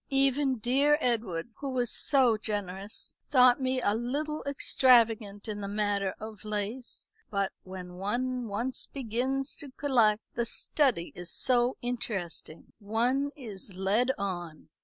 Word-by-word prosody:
Even 270 -1 +2
dear 275 +6 +3
Edward, 225 - -1
who 280 - -4
was 245 -3 0
so 260 -5 +5
generous, 205 -2 -4 0.2
thought 255 -1 +6
me 260 0 +1
a 205 - +3
little 285 +7 -2
extravagant 230 -7 +3
in 205 -1 -4
the 200 - -3
matter 200 -1 0
of 215 -1 -8
lace. 215 +4 -4 0.2
But 200 -2 0
when 185 -1 -9
one 245 +5 -2
once 235 +5 -2
begins 265 +2 -2
to 290 - -9
collect, 235 -6 +2
the 235 0 -1
study 245 - +1
is 175 0 -6
so 245 0 +2
interesting. 195 -9 -4
One 240 +7 +1
is 205 -7 -7
led 200 +7 +1
on." 175 -7 -5
230 Hz, 135 wpm, -29 LUFS, 200-260 Hz, 0.2 s, thought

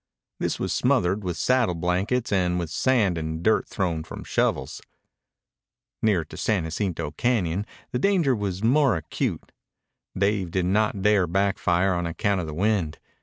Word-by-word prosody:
This - - -1
was - - -1
smothered 95 +4 +1
with 90 -3 -3
saddle 125 -8 +2
blankets 95 +9 -1
and 90 -2 +1
with 85 -3 -3
sand 105 -7 +2
and 80 +1 -4
dirt 110 +2 +2
thrown 85 -5 -2
from - - -8
shovels. - - -1 1.2
Nearer 100 -7 +2
to - - -11
San 105 -6 0
Jacinto 85 -2 -3
Cañon 100 -1 0 0.2
the 125 - -1
danger 175 -9 +3
was 100 -2 -3
more 135 0 +4
acute. 80 - -3 0.7
Dave 100 -2 +1
did 90 +1 0
not 100 +1 +1
dare 105 -3 +4
back 95 +3 0
fire 90 +2 +2
on 85 -1 -1
account 95 +3 0
of 80 - -5
the 75 - -5
wind. 95 -4 0
95 Hz, 160 wpm, -25 LUFS, 85-105 Hz, 1.2 s, more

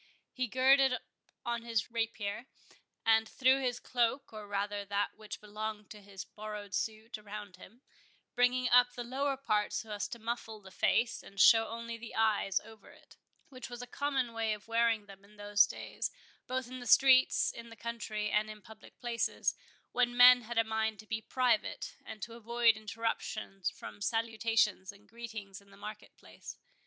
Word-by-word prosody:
He 255 -1 -1
girded 265 +2 +4 0.5
on 235 -1 -1
his 230 -1 -1
rapier, 225 0 -3 0.6
and 225 0 +4
threw 265 +1 +3
his 245 -2 -1
cloak, 240 +1 0
or 215 -1 -8
rather 205 0 -2
that 200 0 -1
which 215 -1 -8
belonged 210 0 -6
to 210 - -10
his 195 -1 -9
borrowed 210 -2 -8
suit, 220 +2 -3
about 205 -2 -8
him, 235 +7 -16 0.5
bringing 250 +1 +3
up 245 0 +5
the 245 - -5
lower 270 +3 -1
part 210 -6 0
so 220 - -4
as 205 -1 -2
to - - -7
muffle 225 -1 -4
the 190 -2 -14
face 235 +4 +1
and 195 - -12
show 225 +2 +7
only 230 0 -6
the 235 0 -9
eyes 215 -3 +2
over 220 -2 -15
it, - - -18 0.3
which 255 -2 -9
was 245 0 -7
a - - -6
common 265 -2 -1
way 225 -1 0
of 210 0 -9
wearing 230 -2 +2
them 195 -1 -14
in 210 +1 -20
those 205 0 +4
days, - - -4 0.4
both 255 -1 -2
in 255 0 -7
streets, 260 0 +6
in 235 0 -10
the 230 - -11
country, 220 -2 -4
and 215 +1 +2
in 210 -1 -10
public 220 +1 -15
places, 240 -2 0 0.4
when 245 -1 +1
men 250 0 +9
had 235 +1 -6
a 225 - +5
mind 220 -1 -1
to 215 - -12
be 220 0 -3
private, 245 -3 0
and 215 -3 -8
to 230 - -6
avoid 235 0 +3
interruption 215 -2 -4
from - - -10
salutations 225 -3 +1
and 200 +1 -20
greetings 220 -4 -8
in 200 - -22
the 195 - -17
market 210 +1 -9
place. - - -11
225 Hz, 175 wpm, -32 LUFS, 210-240 Hz, 0.6 s, men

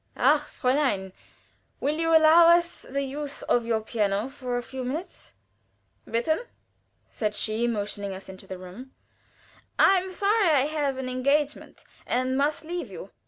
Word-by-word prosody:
"Ach, 295 0 +4
Fräulein! 250 -8 0 0.7
will 300 +3 -1
you 330 0 +1
allow 325 +1 +7
us 340 0 +3
the 275 +1 -1
use 285 +1 -5
of 235 -1 +1
your 225 -1 +1
piano 210 +1 -1
for 255 -3 -4
a 245 - -3
few 260 +2 -6
minutes?" 300 +9 -6 0.8
"Bitte!" 315 - 0 0.6
said 210 -2 -2
she, 220 +3 0
motioning 205 -3 -3
us 190 0 -8
into 190 0 -11
the 190 - -6
room. 185 +9 -11 0.8
"I 385 -1 +6
am 375 +1 -6
sorry 400 +1 +2
I 280 -4 +4
have 290 -3 -1
an 265 -1 -4
engagement, 280 +3 -1 0.2
and 255 +1 0
must 295 +3 0
leave 340 -6 -4
you." 190 0 -9
265 Hz, 155 wpm, -26 LUFS, 225-310 Hz, 0.8 s, allow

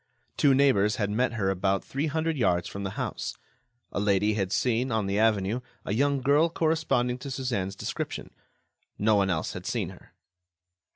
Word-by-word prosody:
Two 140 -2 +4
neighbors 105 -7 +4
had 105 -2 -1
met 120 +3 +1
her 100 -4 0
about 95 +1 0
three 140 +4 -2
hundred 160 +2 -1
yards 90 - +1
from 100 - -6
the 100 - -2
house. - - -3 0.5
A - - -2
lady 105 +1 +2
had 95 -3 -1
seen, 125 +2 +1
on 110 -2 +1
the 100 +1 0
avenue, 110 0 +2 0.3
a - - -1
young 140 +3 +2
girl 145 +5 +4
corresponding 155 -7 +1
to 140 - -7
Suzanne's 120 -8 -2
description. - - -5 0.7
No 110 +1 +3
one 100 -2 +3
else 80 -4 -1
had - - -7
seen - - -1
her. - - -15
110 Hz, 175 wpm, -27 LUFS, 100-135 Hz, 0.7 s, Two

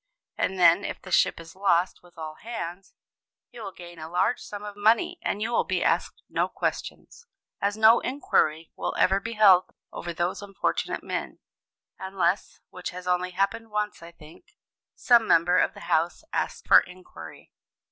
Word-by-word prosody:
And 190 - -1
then, 175 +2 +5
if - - -5
the 185 - -12
ship - - +3
is 165 0 -12
lost 185 -2 +1
with 175 -1 -21
all 155 -1 -6
hands, 195 -5 -7 0.6
you 240 - -11
will 195 - -6
gain 175 -2 -12
a 155 +1 -7
large 190 +7 +1
sum 205 0 -8
of 205 -1 -7
money 215 +2 +2
and 210 - -2
you 230 - -2
will 235 - +2
be - - -1
asked - - 0
no - - 0
questions, 470 - -5 0.3
as 205 +1 0
no 220 +2 +7
inquiry 165 - 0
will - - -3
ever 190 +1 +3
be 230 +3 -6
held 195 -4 +6 0.3
over 175 - -5
those 175 +3 -2
unfortunate 200 -1 -2
men, - - -4 0.6
unless 190 -1 -1
(which 180 - -6
has 180 0 -9
only 180 0 +1
happened 195 +5 -2
once, 210 -3 -3
I 170 0 -11
think), 170 - -17 0.4
some 235 -2 +4
member 175 +2 +4
of - - +1
the - - -11
House 165 - 0
asks - - -2
for - - +9
inquiry. 180 - -12
185 Hz, 175 wpm, -26 LUFS, 175-210 Hz, 0.6 s, for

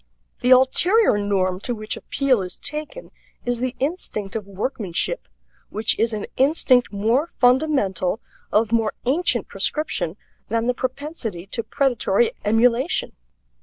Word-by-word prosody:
The 250 - +1
ulterior 265 - +5
norm 190 -2 0
to 245 +4 -3
which 215 0 -4
appeal 265 -6 +1
is 180 -1 -5
taken 305 - -6 0.3
is 245 -1 -1
the 255 0 -2
instinct 260 - -3
of 210 -3 -4
workmanship, 200 - -2 0.4
which 215 +1 0
is 230 +1 +2
an 210 -2 -3
instinct 265 -3 +3
more 225 +9 +1
fundamental, 245 - +1 0.3
of 215 +1 +2
more 225 -2 +1
ancient 305 +9 +1
prescription, 195 - -2 0.3
than 230 +1 0
the 250 - +2
propensity 255 - -4
to 230 +4 -2
predatory 280 - +1
emulation. 245 - +2
245 Hz, 130 wpm, -22 LUFS, 210-275 Hz, 0.4 s, ulterior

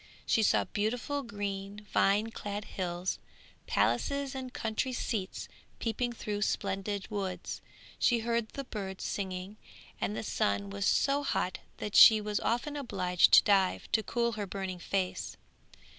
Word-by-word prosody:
She 225 - +3
saw 215 - +4
beautiful 240 +7 -2
green, 205 -3 -5
vine 210 +3 +3
clad 205 -1 -5
hills; 180 0 -3 0.5
palaces 280 -1 +1
and 260 -1 -5
country 225 +3 -2
seats 210 -5 -3 0.3
peeping 240 +2 -1
through 210 -3 -4
splendid 195 -1 -1
woods. 195 -3 -4 0.4
She 235 -2 +3
heard 230 -1 0
the 275 - -5
birds 195 -6 -6
singing, 190 +1 -4 0.4
and 210 - -1
the - - -3
sun 100 - 0
was 100 0 -1
so 280 +1 +3
hot 185 -9 -1 0.2
that 210 - -5
she 220 -1 +10
was 210 0 -1
often 245 +6 -1
obliged 180 -10 +2
to - - +10
dive, 195 -3 +2
to 220 - +3
cool 235 +1 0
her 210 -3 -4
burning 190 -1 -4
face. 185 +1 -2
210 Hz, 145 wpm, -31 LUFS, 195-235 Hz, 0.5 s, she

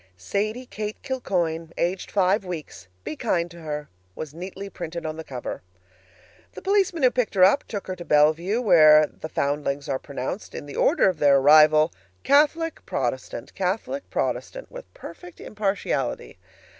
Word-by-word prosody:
"Sadie 215 - -2
Kate 215 -3 -6
Kilcoyne, 170 - -2
aged 180 +2 -1
five 195 +1 +2
weeks. 160 - -7 0.2
Be 150 - -5
kind 170 +2 -1
to 170 - -12
her," 150 -1 -5 0.3
was 155 -2 -7
neatly 190 +4 -7
printed 170 -3 -6
on 155 0 -3
the 160 - -7
cover. 130 -5 -6 0.9
The - - -9
policeman 385 -5 +1
who 255 - +6
picked 250 -5 -1
her 185 - +5
up 200 +10 +5
took 205 -3 -5
her 185 - -4
to 175 - -8
Bellevue 160 +7 +3
where 155 -8 +7
the 155 - -9
foundlings 145 -1 -2
are 135 -1 -1
pronounced, 140 +7 -6
in - - -6
the 145 - -9
order 315 - +3
of 180 -4 0
their 140 -1 +5
arrival, 155 +3 +6 0.3
"Catholic, 310 +3 +2
Protestant, 125 -2 -3
Catholic, 210 +9 -3
Protestant," - - -3
with - - -10
perfect 175 +1 -11
impartiality. 205 -2 -3
175 Hz, 155 wpm, -24 LUFS, 150-215 Hz, 0.9 s, where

